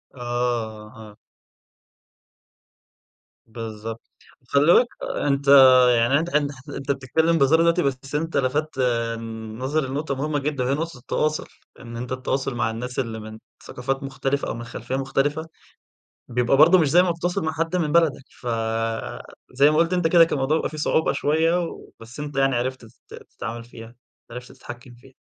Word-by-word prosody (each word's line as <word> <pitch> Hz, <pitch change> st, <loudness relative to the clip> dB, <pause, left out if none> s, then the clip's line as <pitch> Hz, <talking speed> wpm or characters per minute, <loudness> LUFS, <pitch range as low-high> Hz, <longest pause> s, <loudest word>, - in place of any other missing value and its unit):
آه 120 Hz, -3 st, -3 dB
أه. 105 Hz, 0 st, -14 dB, 2.3 s
بالضبط، 115 Hz, 0 st, -7 dB, 0.4 s
وخلّي 140 Hz, +6 st, +3 dB
بالك 245 Hz, -, +5 dB, 0.4 s
أنت 140 Hz, -1 st, 0 dB, 0.5 s
يعني 120 Hz, +5 st, +3 dB
أنت 170 Hz, +2 st, -3 dB
حت 145 Hz, -2 st, +1 dB
ح 135 Hz, +1 st, -14 dB
أنت 140 Hz, +1 st, -3 dB
بتتكلم 160 Hz, +5 st, +1 dB
بهزار 150 Hz, +3 st, +4 dB
دلوقتي، 170 Hz, +1 st, +3 dB
بس 135 Hz, +1 st, -3 dB
أنت 165 Hz, +2 st, -1 dB
لفتّ 145 Hz, +3 st, -1 dB
آمم، 115 Hz, -2 st, -2 dB
نظري 135 Hz, +2 st, -1 dB
لنقطة 140 Hz, +1 st, -3 dB
مهمة 145 Hz, +2 st, -1 dB
جدًا، 140 Hz, -2 st, -2 dB
وهي 130 Hz, +2 st, 0 dB
نقطة 165 Hz, 0 st, -3 dB
التواصل، 155 Hz, +4 st, -2 dB, 0.3 s
إن 120 Hz, -1 st, -9 dB
أنت 125 Hz, +1 st, -6 dB
التواصل 130 Hz, 0 st, -2 dB
مع 110 Hz, -2 st, 0 dB
الناس 125 Hz, +3 st, -5 dB
اللي 115 Hz, -4 st, -3 dB
من 110 Hz, 0 st, -10 dB, 0.3 s
ثقافات 135 Hz, +3 st, -4 dB
مختلفة 135 Hz, +1 st, -2 dB
أو -, -, -2 dB
من 120 Hz, -, -7 dB
خلفية 120 Hz, +2 st, -6 dB
مختلفة، 135 Hz, +4 st, -1 dB, 0.8 s
بيبقى 125 Hz, +2 st, +1 dB
برضو 170 Hz, +5 st, +7 dB
مش 160 Hz, -5 st, +2 dB
زي 175 Hz, +5 st, +5 dB
ما 180 Hz, -, +1 dB
بتتواصل 175 Hz, +2 st, -2 dB
مع 160 Hz, -, -1 dB
حد 165 Hz, +2 st, -2 dB
من 165 Hz, -4 st, 0 dB
بلدك، 160 Hz, -4 st, +2 dB, 0.2 s
فزَي 115 Hz, +4 st, -1 dB
ما 155 Hz, -, +1 dB
قُلت 165 Hz, +2 st, +2 dB
أنت 175 Hz, -2 st, +2 dB
كده 170 Hz, 0 st, +6 dB
كان -, -, -4 dB
الموضوع 145 Hz, +3 st, +1 dB
بيبقى -, -, -2 dB
فيه 155 Hz, -, -9 dB
صعوبة 160 Hz, +1 st, +1 dB
شوية 160 Hz, +4 st, +1 dB
و -, -, -10 dB
بس 115 Hz, +4 st, -12 dB
أنت 145 Hz, -1 st, -6 dB
يعني 135 Hz, -1 st, +2 dB
عرفت 130 Hz, +2 st, -2 dB
تت 110 Hz, -, -19 dB, 0.2 s
تتعامل 115 Hz, +1 st, -6 dB
فيها، 115 Hz, 0 st, -13 dB, 0.4 s
عرفت 125 Hz, +1 st, -9 dB
تتحكم 120 Hz, +1 st, -11 dB
فيها. 130 Hz, +2 st, -19 dB
135 Hz, 165 wpm, -23 LUFS, 120-155 Hz, 2.3 s, برضو